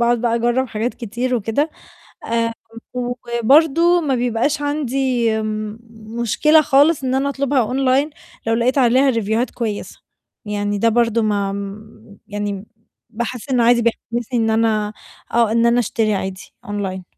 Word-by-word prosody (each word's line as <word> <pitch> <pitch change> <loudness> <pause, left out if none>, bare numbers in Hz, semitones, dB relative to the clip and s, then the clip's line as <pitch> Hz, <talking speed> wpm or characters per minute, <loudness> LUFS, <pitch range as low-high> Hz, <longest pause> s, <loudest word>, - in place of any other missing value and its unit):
وباقعد 235 0 +2
بقى 235 -1 +1
أجرّب 240 +3 +1
حاجات 225 +3 -2
كتير 240 +3 -3
وكده، 235 +7 0 0.5
آآ 230 0 0 0.4
وبرضه 265 +8 +2
ما 285 -5 0
بيبقاش 245 +5 0
عندي 270 -4 0 0.9
مشكلة 305 +7 +4
خالص 285 +1 +3
إن 260 0 0
أنا 275 +1 +1
أطلبها 280 -1 0
أونلاين 265 +5 +1 0.4
لو 225 - +2
لقيت 245 +4 +1
عليها 260 +2 +4
ريفيوهات 230 +1 0
كويسة، 220 -4 -5 0.4
يعني 205 0 -2
ده 230 - +3
برضه 230 0 +2
ما 200 -2 0 0.7
يعني 205 -1 -4 0.4
باحس 235 +2 -5
إنه 245 -3 +3
عادي 235 0 +4
بيحسسني 235 +1 -2
إن 225 0 +1
أنا 220 -1 +1 0.4
آه، 230 -2 +3
إن 230 +1 +3
أنا 235 +1 +3
أشتري 220 -1 0
عادي 190 -1 -4 0.2
أونلاين. 195 -3 -4
235 Hz, 135 wpm, -19 LUFS, 220-260 Hz, 0.9 s, مشكلة